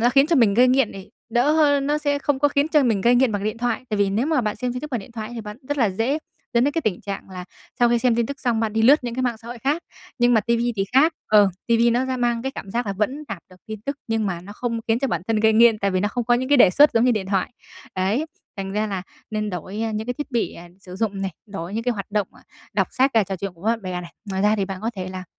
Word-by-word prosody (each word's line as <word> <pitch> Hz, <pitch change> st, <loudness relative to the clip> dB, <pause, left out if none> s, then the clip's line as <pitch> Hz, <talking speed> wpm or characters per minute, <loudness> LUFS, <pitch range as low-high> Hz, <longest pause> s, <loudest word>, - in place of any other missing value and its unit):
nó 240 Hz, +2 st, +4 dB
khiến 275 Hz, +2 st, +5 dB
cho 330 Hz, -1 st, +2 dB
mình 215 Hz, -5 st, +4 dB
gây 250 Hz, +2 st, +5 dB
nghiện 255 Hz, -3 st, +3 dB
thì 195 Hz, +1 st, -10 dB, 0.2 s
đỡ 245 Hz, +5 st, +3 dB
hơn, 285 Hz, -3 st, +3 dB
nó 295 Hz, +1 st, +1 dB
sẽ 285 Hz, -1 st, 0 dB
không 285 Hz, -1 st, 0 dB
có 290 Hz, +1 st, +3 dB
khiến 285 Hz, +2 st, +1 dB
cho 305 Hz, -2 st, +4 dB
mình 260 Hz, -, +2 dB
mình 215 Hz, -4 st, +1 dB
gây 240 Hz, +3 st, +5 dB
nghiện 255 Hz, -2 st, +3 dB
bằng 205 Hz, -1 st, -2 dB
điện 215 Hz, +2 st, -2 dB
thoại. 240 Hz, +1 st, -1 dB
Tại 210 Hz, -, 0 dB
vì 200 Hz, -1 st, +2 dB
nếu 225 Hz, +7 st, 0 dB
mà 310 Hz, -4 st, +2 dB
bạn 215 Hz, -3 st, -2 dB
xem 250 Hz, +2 st, -2 dB
tin 250 Hz, -, -5 dB
tức 300 Hz, -, -7 dB
bằng 240 Hz, -, -1 dB
điện 215 Hz, +4 st, -13 dB
thoại 220 Hz, 0 st, -6 dB
thì 230 Hz, -, -5 dB
bạn 210 Hz, 0 st, -8 dB
rất 290 Hz, -1 st, -1 dB
là 225 Hz, -5 st, +3 dB
dễ 230 Hz, +10 st, 0 dB, 0.4 s
dẫn 235 Hz, -, +4 dB
đến 285 Hz, -, +1 dB
cái 330 Hz, -, -1 dB
tình 205 Hz, -8 st, -1 dB
trạng 195 Hz, -1 st, -6 dB
là 180 Hz, -1 st, -7 dB, 0.4 s
sau 240 Hz, -, +5 dB
khi 235 Hz, 0 st, +3 dB
xem 245 Hz, -1 st, +2 dB
tin 235 Hz, -, +1 dB
tức 280 Hz, +2 st, -7 dB
xong 235 Hz, -3 st, 0 dB
bạn 220 Hz, -2 st, -1 dB
đi 220 Hz, -, +1 dB
lướt 265 Hz, +3 st, +5 dB
những 235 Hz, -, -3 dB
cái 255 Hz, -, -2 dB
mạng 240 Hz, -3 st, -1 dB
xã 230 Hz, +1 st, -12 dB
hội 240 Hz, -, -7 dB
khác 285 Hz, +7 st, -1 dB, 0.4 s
nhưng 240 Hz, 0 st, +4 dB
mà 220 Hz, -, +5 dB
ti 235 Hz, +3 st, +1 dB
vi 240 Hz, +1 st, 0 dB
thì 195 Hz, -, +1 dB
khác, 305 Hz, +5 st, +5 dB, 0.2 s
ờ, 210 Hz, -2 st, +5 dB, 0.2 s
ti 235 Hz, -, +3 dB
vi 235 Hz, +1 st, +4 dB
nó 245 Hz, +3 st, +1 dB
sẽ 260 Hz, 0 st, -2 dB
mang 240 Hz, -1 st, 0 dB
cái 265 Hz, -, -3 dB
cảm 200 Hz, -, -8 dB
giác 235 Hz, +2 st, -2 dB
là 200 Hz, -, -1 dB
vẫn 255 Hz, +10 st, -2 dB
đạt 200 Hz, -, -5 dB
được 185 Hz, -, -16 dB
tin 215 Hz, -1 st, -7 dB
tức 280 Hz, +4 st, -4 dB
nhưng 225 Hz, -1 st, 0 dB
mà 175 Hz, -3 st, -3 dB
nó 200 Hz, -, -10 dB
không 230 Hz, +1 st, -3 dB
khiến 225 Hz, +1 st, +3 dB
cho 275 Hz, -, 0 dB
bản 175 Hz, -5 st, -2 dB
thân 225 Hz, -, +2 dB
gây 220 Hz, 0 st, +4 dB
nghiện, 225 Hz, 0 st, +5 dB
tại 200 Hz, -1 st, 0 dB
vì 185 Hz, -1 st, 0 dB
nó 205 Hz, -, +1 dB
không 240 Hz, +2 st, -3 dB
có 240 Hz, +1 st, +3 dB
những 255 Hz, +2 st, -1 dB
cái 290 Hz, -, +5 dB
đề 195 Hz, -, +7 dB
xuất 290 Hz, +10 st, +5 dB
giống 230 Hz, +1 st, +4 dB
như 250 Hz, -, +4 dB
điện 205 Hz, -4 st, -2 dB
thoại. 190 Hz, -1 st, 0 dB, 0.5 s
Đấy, 205 Hz, +11 st, 0 dB, 0.3 s
thành 195 Hz, 0 st, -4 dB
ra 215 Hz, +1 st, 0 dB
là 195 Hz, -3 st, -3 dB, 0.3 s
nên 215 Hz, -1 st, -2 dB
đổi, 190 Hz, +4 st, -5 dB
ơ, 225 Hz, -1 st, -2 dB
những 215 Hz, +2 st, -3 dB
cái 245 Hz, -, -2 dB
thiết 295 Hz, 0 st, -6 dB
bị, 235 Hz, -3 st, -1 dB
à, 175 Hz, +1 st, -11 dB
sử 185 Hz, -1 st, -10 dB
dụng 200 Hz, -2 st, -2 dB
này, 190 Hz, -, -2 dB
đổi 195 Hz, -2 st, -6 dB
những 225 Hz, -, -1 dB
cái 245 Hz, -, +1 dB
hoạt 200 Hz, -2 st, -6 dB
động, 205 Hz, -2 st, 0 dB
à, -, -, -18 dB, 0.3 s
đọc -, -, +1 dB
sách 265 Hz, +1 st, +2 dB
và 220 Hz, -3 st, +4 dB
trò 190 Hz, 0 st, -4 dB
chuyện 195 Hz, +1 st, -5 dB
cùng 170 Hz, -, -19 dB
với 225 Hz, -, +3 dB
bạn 230 Hz, -, -5 dB
bè 180 Hz, -1 st, -4 dB
này. 170 Hz, -1 st, -11 dB, 0.2 s
Ngoài 190 Hz, +1 st, -1 dB
ra 210 Hz, +1 st, +3 dB
thì 200 Hz, -, 0 dB
bạn 190 Hz, 0 st, -6 dB
có 225 Hz, -, -2 dB
thể 185 Hz, -1 st, -4 dB
là 185 Hz, 0 st, -7 dB
225 Hz, 335 wpm, -22 LUFS, 200-255 Hz, 0.5 s, đề